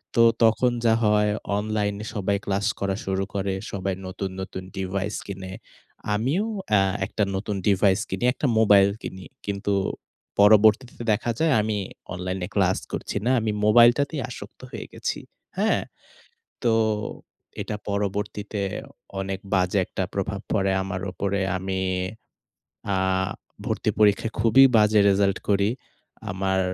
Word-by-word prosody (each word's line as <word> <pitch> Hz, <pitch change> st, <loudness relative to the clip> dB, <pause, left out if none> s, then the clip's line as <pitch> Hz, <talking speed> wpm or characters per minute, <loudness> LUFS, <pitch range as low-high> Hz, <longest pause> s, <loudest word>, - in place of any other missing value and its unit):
তো 115 Hz, -, +6 dB, 0.2 s
তখন 115 Hz, +3 st, +4 dB
যা 110 Hz, -, +5 dB
হয় 105 Hz, 0 st, +3 dB, 0.3 s
অনলাইনে 105 Hz, 0 st, -2 dB
সবাই 100 Hz, 0 st, 0 dB
ক্লাস 100 Hz, 0 st, 0 dB
করা 100 Hz, -1 st, 0 dB
শুরু 95 Hz, 0 st, 0 dB
করে, 95 Hz, -1 st, -1 dB, 0.2 s
সবাই 95 Hz, -1 st, -2 dB
নতুন 95 Hz, +1 st, -4 dB
নতুন 95 Hz, 0 st, -6 dB
ডিভাইস 95 Hz, +2 st, -2 dB
কিনে, 95 Hz, -1 st, -6 dB, 0.6 s
আমিও 140 Hz, -, 0 dB, 0.3 s
এ -, -, +5 dB, 0.3 s
১ -, -, -11 dB
টা 105 Hz, -, +3 dB
নতুন 100 Hz, +1 st, -3 dB
ডিভাইস 100 Hz, 0 st, +4 dB
কিনি -, -, -3 dB
১ -, -, -9 dB
টা 145 Hz, -, +2 dB
মোবাইল 100 Hz, -2 st, +6 dB
কিনি। 95 Hz, 0 st, -7 dB, 0.2 s
কিন্তু 100 Hz, 0 st, -1 dB, 0.7 s
পরবর্তীতে 110 Hz, +4 st, +5 dB
দেখা 115 Hz, +3 st, 0 dB
যায় 160 Hz, -3 st, +3 dB
আমি 105 Hz, -1 st, -1 dB, 0.4 s
অনলাইনে 90 Hz, 0 st, -3 dB
ক্লাস -, -, +3 dB
করছি -, -, -3 dB
না 125 Hz, -, +3 dB
আমি 110 Hz, -1 st, -1 dB
মোবাইলটাতেই 120 Hz, +6 st, +5 dB
আসক্ত 100 Hz, -2 st, -10 dB
হয়ে 115 Hz, -, -6 dB
গেছি। -, -, -3 dB, 0.4 s
হ্যাঁ? -, -, +2 dB, 0.8 s
তো, 115 Hz, -2 st, +3 dB, 0.9 s
এটা 105 Hz, -, -3 dB
পরবর্তীতে 105 Hz, +1 st, -2 dB, 0.6 s
অনেক 95 Hz, 0 st, -3 dB
বাজে 90 Hz, +1 st, +2 dB
একটা -, -, -3 dB
প্রভাব -, -, -2 dB
পড়ে 95 Hz, 0 st, +2 dB
আমার 95 Hz, -1 st, -4 dB
উপরে, 100 Hz, +1 st, -1 dB, 0.2 s
আমি 95 Hz, 0 st, -2 dB, 1.1 s
আ -, -, +1 dB, 0.7 s
ভর্তি -, -, 0 dB
পরীক্ষায় 105 Hz, +1 st, +3 dB
খুবই 115 Hz, +4 st, +7 dB
বাজে 105 Hz, 0 st, +5 dB
রেজাল্ট 100 Hz, 0 st, +2 dB
করি 100 Hz, +1 st, +3 dB, 0.6 s
।আমার 95 Hz, 0 st, 0 dB
100 Hz, 135 wpm, -25 LUFS, 95-110 Hz, 1.1 s, খুবই